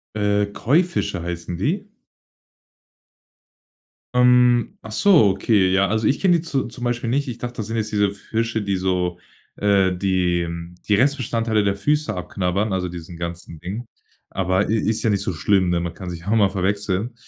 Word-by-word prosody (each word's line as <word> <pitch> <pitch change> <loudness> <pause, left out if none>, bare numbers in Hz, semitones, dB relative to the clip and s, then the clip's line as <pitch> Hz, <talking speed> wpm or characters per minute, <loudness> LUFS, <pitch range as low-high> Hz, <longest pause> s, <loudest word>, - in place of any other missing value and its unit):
Äh, 105 -1 +1
Koi-Fische 145 - 0
heißen 85 0 -5
die? 190 - -2 2.2
Ähm, 125 -1 +4
ach 110 - -9
so, 160 - +5
okay. 95 -2 +2
Ja, 95 0 +3
also 110 +1 0
ich 140 - +1
kenn 185 -2 +4
die 170 - +2
zu 140 -5 -1
zum 120 +1 -7
Beispiel 120 0 -1
nicht. 140 +3 0
Ich 120 -1 -5
dachte, 120 0 -5
das 110 - -4
sind 115 +1 -3
jetzt 110 -1 -2
diese 105 -1 +2
Fische, 115 +2 -2
die 100 -1 -1
so, 90 -1 -1 0.4
äh 100 -2 +3
die 90 -2 +1 0.4
die 105 - +3
Restbestandteile 115 -3 +1
der 100 0 +1
Füße 145 +1 0
abknabbern, 95 +3 -2
also 90 -1 -1
diesen 85 0 -9
ganzen 85 -1 -6
Dingen. 105 +8 -6 0.4
Aber 95 +1 0
i 110 - +1
ist 110 +1 0
ja 115 - +2
nicht 100 -2 0
so 95 - -2
schlimm, 95 +2 +2
ne? 85 - +1
Man 85 -1 -4
kann 95 -2 -7
sich 85 -1 -6
ja 85 - -15
auch 110 - +2
mal 100 -3 +4
verwechseln. 100 +3 -1
105 Hz, 180 wpm, -22 LUFS, 95-120 Hz, 2.2 s, so